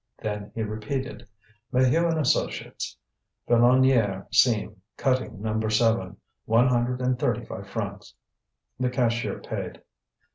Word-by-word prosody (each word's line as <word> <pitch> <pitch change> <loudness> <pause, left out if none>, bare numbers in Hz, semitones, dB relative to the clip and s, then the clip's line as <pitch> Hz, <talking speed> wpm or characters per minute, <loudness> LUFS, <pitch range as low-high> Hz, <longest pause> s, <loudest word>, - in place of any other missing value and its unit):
Then 105 -1 -5
he 115 - -1
repeated: 110 +6 -4 0.4
"Maheu 130 +7 +3
and 160 -1 0
associates, 145 - -1 0.5
Filonniére 120 -5 +4
seam, 110 -4 +3 0.2
cutting 130 -6 0
No. 110 0 0
7. 110 -4 +1 0.3
One 115 +3 +4
hundred 125 0 +1
and 125 0 0
thirty - - 0
five - - -8
francs." - - -5 0.6
The 130 -1 +1
cashier 120 -2 0
paid. - - -6
120 Hz, 115 wpm, -26 LUFS, 110-130 Hz, 0.6 s, Filonniére